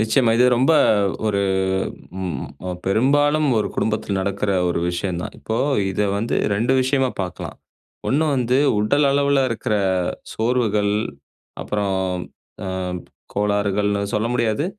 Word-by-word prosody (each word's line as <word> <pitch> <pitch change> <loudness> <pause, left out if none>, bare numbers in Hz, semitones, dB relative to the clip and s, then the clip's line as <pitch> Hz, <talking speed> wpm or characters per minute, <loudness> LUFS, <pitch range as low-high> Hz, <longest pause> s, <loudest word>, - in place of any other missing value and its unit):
நிச்சயமா, 115 +2 +3
இது 125 - +5
ரொம்ப 130 +7 +3 0.5
ஒரு 100 -2 +1 0.8
ம், 85 -8 -3 0.2
ஒ - - -3 0.2
பெரும்பாலும் 145 +8 +3
ஒரு 105 - 0
குடும்பத்துல 105 -2 -1
நடக்குற 100 +1 -1 0.2
ஒரு 85 - 0
விஷயம் 85 0 -3
தான். - - -7
இப்போ 110 - -3 0.3
இத 95 - -3 0.2
வந்து 115 +3 -1 0.2
2 115 +6 +1
விஷயமா 130 0 +1
பாக்கலாம். 90 -2 -6 0.5
1 150 +4 +2
வந்து, 125 -1 +1 0.2
உடல் 140 +8 +2
அளவுல 140 0 +3
இருக்குற 115 0 -1 0.6
சோர்வுகள். 110 -3 +1 0.7
அப்புறம், 100 -2 -1 0.7
அ - - -4 0.7
கோளாறுகள்ன்னு 100 0 +1
சொல்ல 105 +2 +1
முடியாது. 115 +3 +1
110 Hz, 120 wpm, -21 LUFS, 100-130 Hz, 0.8 s, இது